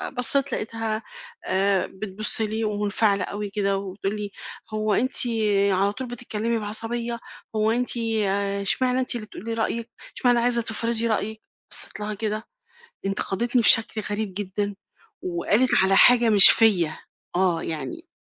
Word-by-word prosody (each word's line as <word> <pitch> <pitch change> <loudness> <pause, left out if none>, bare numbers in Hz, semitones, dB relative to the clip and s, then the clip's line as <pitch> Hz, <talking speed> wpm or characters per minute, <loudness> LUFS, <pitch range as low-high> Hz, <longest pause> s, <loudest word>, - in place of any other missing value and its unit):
آآ - - -5
بصّيت 275 +1 +2
لقيتها 225 0 -4 0.4
آآ 195 0 0
بتبُص 210 +2 -1
لي 220 +1 -2
ومُنفعلة 205 -1 0
أوي 205 0 -6
كده 200 -1 -1
وبتقول 195 +1 -5
لي: 205 -1 -6 0.4
"هو 215 -1 -1
أنتِ 255 +6 0 0.5
على 195 +2 +1
طول 260 +3 -7
بتتكلِّمي 235 -1 -4
بعصبية، 230 +2 -4 0.4
هو 215 +1 +1
أنتِ 245 +1 0 0.6
إشمعنى 250 +6 +1
أنتِ 255 - 0
اللي 215 -2 -7
تقولي 225 +1 -7
رأيِّك، 230 +1 -3 0.3
إشمعنى 245 -1 +2
عايزة 235 0 +3
تفرضي 230 +1 0
رأيِّك؟" 220 0 -3 0.3
بصّيت - - +1
لها 210 0 -4
كده 215 +1 -4 0.6
انتقدتني 215 +5 -1
بشكل 225 -1 +4
غريب 205 -1 -4
جدًا 205 +1 -4 0.5
وقالت 195 +8 0
على 195 0 +4
حاجة 240 -2 +6
مش 205 -2 +10
فيّا 185 -9 +3 0.4
آه، 180 -3 0
يعني 160 - -6
215 Hz, 140 wpm, -23 LUFS, 200-235 Hz, 0.6 s, مش